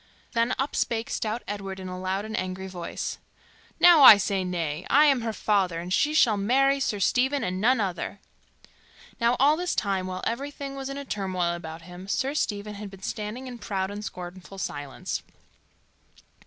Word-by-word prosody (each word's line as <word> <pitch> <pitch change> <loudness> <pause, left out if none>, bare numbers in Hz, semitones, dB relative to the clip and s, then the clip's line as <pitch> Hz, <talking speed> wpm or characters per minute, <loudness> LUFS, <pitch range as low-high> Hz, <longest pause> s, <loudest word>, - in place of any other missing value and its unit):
Then 235 +2 +1
up 270 +2 -2
spake 230 0 -1
stout 225 +1 -2
Edward 195 -2 -5
in 185 - -6
a 185 0 -6
loud 190 +2 -2
and 220 0 -5
angry 185 +1 -3
voice, 180 -2 -5 0.6
"Now 350 -3 +8
I 220 -6 +12
say 200 -1 0
nay! 170 -3 -3
I 295 +3 +6
am 275 -4 +4
her 225 -1 -2
father, 195 -6 +1
and 175 +2 -4
she 300 +9 +2
shall 225 -8 +5
marry 270 +7 +3
Sir 215 -6 -1
Stephen 265 +7 +2
and 185 +1 -2
none 250 +3 +4
other." 190 -4 -3 1.0
Now 235 +1 +2
all 285 +3 +5
this 355 +2 -2
time, 195 -3 0
while 185 0 -5
everything 280 +3 -4
was 270 0 -5
in 280 +1 -5
turmoil 185 -6 -1
about 165 -1 -7
him, 180 +2 -10
Sir 265 +7 0
Stephen 210 -7 -2
had 205 0 -7
been 195 0 -14
standing 215 +6 -4
in 245 -2 -8
proud 195 -3 -2
and 205 +1 -6
scornful 180 0 -8
silence. 145 -7 -4
205 Hz, 180 wpm, -26 LUFS, 185-255 Hz, 1.0 s, I